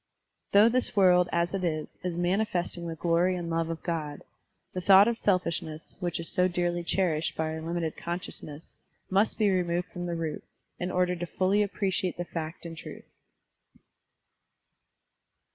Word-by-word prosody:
Though 205 +2 +7
this 250 0 0
world, 180 -3 +5
as 170 +1 0
it 195 -2 -2
is, 155 -3 -1 0.2
is 180 -2 -2
manifesting 175 -2 0
the 165 - -4
glory 175 +2 +2
and 170 -2 -4
love 165 0 0
of 165 -1 -5
God, 155 -4 -3 0.5
the 185 - -3
thought 195 +3 +7
of 235 - +1
selfish 180 -6 +1
ness 155 0 -10
which 175 -3 -2
is 165 - -4
so 180 +3 +2
dearly 175 -1 -1
cherished 165 -3 0
by 160 0 -1
our 160 - -5
limited 165 -1 -2
consciousness 170 -3 -6 0.4
must 200 +3 +2
be 210 -2 +3
removed 175 -1 0
from 175 0 -5
the 170 - -2
root, 160 -2 -3 0.4
in 180 - -2
order 180 0 +1
fully 190 +4 +1
to 210 - +4
appreciate 190 -2 -1
the 175 - -3
fact 165 0 -6
and 165 -1 -6
truth. - - -9
175 Hz, 165 wpm, -28 LUFS, 165-185 Hz, 0.5 s, Though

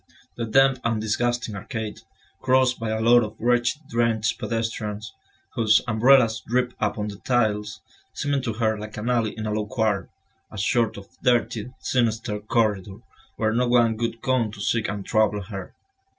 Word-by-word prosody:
The 115 - -3
damp 135 +3 +4
and 115 -1 0
disgusting 115 +1 -1
arcade, 110 +1 -5 0.4
crossed 130 -1 +3
by 115 -1 -3
a 110 0 -1
lot 120 +2 +5
of 110 0 -6
wretched 120 +5 +1
drenched 115 -2 0
pedestrians, 110 -1 -3 0.4
whose 110 -1 +4
umbrellas 115 0 +4
dripped 125 +1 0
upon 105 0 -1
the 100 - -8
tiles, 110 -3 0 0.3
seemed 140 -2 -1
to 115 - -1
her 110 -1 0
like 105 +1 -8
an 115 +4 -1
alley 115 -3 0
in 110 - -4
a 105 - -2
low 105 -1 -2
quarter, 110 -4 -1 0.4
a 110 - -10
sort 115 +2 +1
of 100 - -9 0.2
dirty, 120 -2 +1
sinister 115 -3 0
corridor, 105 -3 0 0.4
where 110 -1 0
no 125 +2 +1
one 120 -2 +3
would 115 0 -3
come 125 -5 +1
to 110 - -11
seek 110 +2 0
and 100 -1 -4
trouble 110 -2 +2
her. 95 -2 -8
110 Hz, 165 wpm, -24 LUFS, 105-120 Hz, 0.4 s, lot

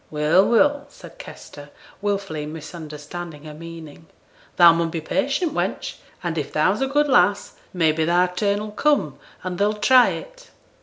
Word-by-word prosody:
'Well, 155 +5 +3
well!' 285 +4 +2
said - - -15
Kester, 145 0 -11 0.3
wilfully 195 -7 -3
misunderstanding 155 0 -8
her 155 -1 -9
meaning, 165 -1 -11 0.5
'thou 170 -2 +7
mun 165 0 -1
be 165 - -4
patient, 280 - -1
wench; - - -3 0.3
and 165 -2 -2
if 145 - -5
thou's 185 +9 +1
a 270 - +1
good 295 +2 +1
lass, 205 -6 +2 0.2
may 165 -4 +2
be 160 +1 -1
thy 175 +2 +3
turn 200 +3 -1
'll 215 - -7
come 210 - 0 0.2
and 180 -1 -5
they 200 - +3
'll 210 - +1
try 250 +4 +5
it.' - - -9
175 Hz, 165 wpm, -22 LUFS, 155-210 Hz, 0.5 s, thou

